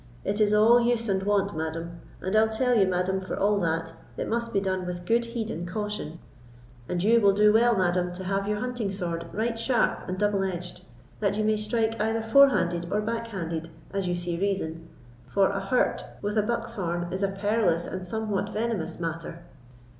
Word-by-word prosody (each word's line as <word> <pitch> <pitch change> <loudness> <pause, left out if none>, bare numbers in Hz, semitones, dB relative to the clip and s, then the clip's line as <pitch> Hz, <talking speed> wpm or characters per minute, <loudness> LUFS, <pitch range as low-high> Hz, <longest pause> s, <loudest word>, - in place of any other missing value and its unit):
It 205 +2 0
is 210 -1 +4
all 220 +3 +6
use 235 -1 +1
and 190 -2 +1
wont, 200 -1 +1
madam; 165 +2 -4 0.2
and 190 +3 -2
I'll 220 0 +5
tell 250 +3 +1
you, 200 -5 +4
madam, 185 +1 0
for 190 - -5
all 205 +1 +2
that, 165 -2 -1 0.2
it - - -2
must 235 0 -1
be 200 - +2
done 185 -2 -2
with 175 0 -5
good 235 +4 +2
heed 230 -1 -4
and 170 +2 -4
caution; 210 -4 -4 0.7
and 175 0 -1
you 230 +3 +5
will 200 -1 +5
do 210 +1 +5
well, 235 0 +4
madam, 180 -1 +1
to 185 +1 -6
have 195 +1 -1
your 210 0 0
hunting 245 -2 -2
sword 170 -4 -3
right 225 +2 -1
sharp 240 -4 +1
and 185 - -2
double 205 -1 +1
edged, 180 -1 -5 0.4
that 200 -1 0
you 215 - +1
may 215 0 +3
strike 220 +1 0
either 225 +1 0
fore 275 +5 +7
handed 175 -6 0
or 210 - +1
back 230 +2 -2
handed, 165 -6 -4 0.2
as 195 -2 -1
you 175 - 0
see 175 -1 -3
reason, 165 -5 -2 0.4
for 195 -1 +2
a 200 - -2
hurt 195 +6 +1 0.2
with 205 +1 -1
a 215 - +4
buck's 235 +2 -2
horn 175 -4 -2
is 190 - -2
a 195 - +3
perilous 195 -3 +1
and 185 0 -5
somewhat 205 +1 -2
venomous 210 -8 -2
matter." 165 0 -5
200 Hz, 205 wpm, -27 LUFS, 180-220 Hz, 0.7 s, fore